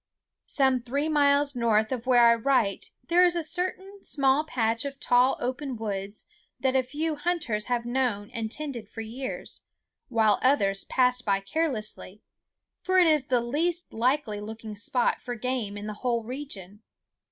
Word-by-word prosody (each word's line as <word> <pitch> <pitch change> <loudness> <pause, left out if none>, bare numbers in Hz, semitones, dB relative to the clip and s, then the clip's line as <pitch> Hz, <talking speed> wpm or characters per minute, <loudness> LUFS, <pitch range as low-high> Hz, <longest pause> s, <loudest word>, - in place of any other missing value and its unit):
Some 265 -3 +2
three 280 +5 -2
miles 285 -2 +3
north 220 -2 +2
of 250 -1 -4
where 245 -2 +6
I 235 - +7
write 235 -4 +1 0.2
there 350 +1 +5
is 350 -1 +4
a 340 - -1
certain 375 +4 -3
small 275 +1 +2
patch 230 -6 -1
of 280 -1 -6
tall 250 +2 +3
open 260 +1 -3
woods 200 -1 -5 0.3
that 265 -1 0
a 265 - +5
few 300 +5 -3
hunters 290 -9 -1
have 240 -1 -1
known 240 -5 -1
and 220 -1 -4
tended 255 -7 -4
for 225 - -7
years, 245 +4 -6 0.5
while 220 -4 +3
others 200 -8 +2
passed 250 -1 +2
by 200 -2 +1
carelessly, 215 - -3 0.6
for 370 0 +1
it 365 - +7
is 305 -5 +3
the 250 -2 +2
least 325 +8 -2
likely 230 -2 0
looking 220 0 -7
spot 240 +4 0
for 245 -1 -5
game 240 -4 -3
in 205 - -7
the 210 - -4
whole 235 -2 0
region. 220 -6 -8
250 Hz, 165 wpm, -27 LUFS, 220-285 Hz, 0.6 s, I